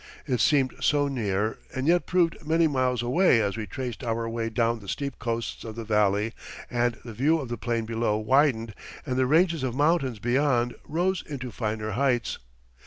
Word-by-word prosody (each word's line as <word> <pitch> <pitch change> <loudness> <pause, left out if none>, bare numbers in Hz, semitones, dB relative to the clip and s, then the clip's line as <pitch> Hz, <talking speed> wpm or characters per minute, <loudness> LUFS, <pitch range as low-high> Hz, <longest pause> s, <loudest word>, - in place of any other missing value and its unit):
It 125 -4 0
seemed 135 +3 +3
so 145 -1 +2
near 110 -5 -1 0.2
and 130 0 -2
yet 175 +2 +3
proved 175 -2 +1
many 165 +2 +3
miles 130 -5 +1
away 130 +1 +4
as 100 -2 0
we 110 -2 -5
traced 125 +4 -5
our 115 -1 -1
way 115 0 -2
down 115 +1 0
the 100 - -13
steep 140 +5 -4
coasts 115 +1 -3
of 110 -2 -7
the 115 - -5
valley 105 0 +1 0.4
and 120 0 +1
the 115 - -7
view 145 +9 +2
of 135 -5 -6
the 120 - -2
plain 115 0 -1
below 115 -1 0
widened 115 -1 +2 0.3
and 130 -4 -2
the 130 0 +2
ranges 165 +2 +3
of 130 -2 -2
mountains 145 -4 +2
beyond 120 +1 +1
rose 175 +3 0
into 130 -4 -5
finer 110 -1 -3
heights. 120 -1 0
120 Hz, 185 wpm, -26 LUFS, 115-140 Hz, 0.4 s, away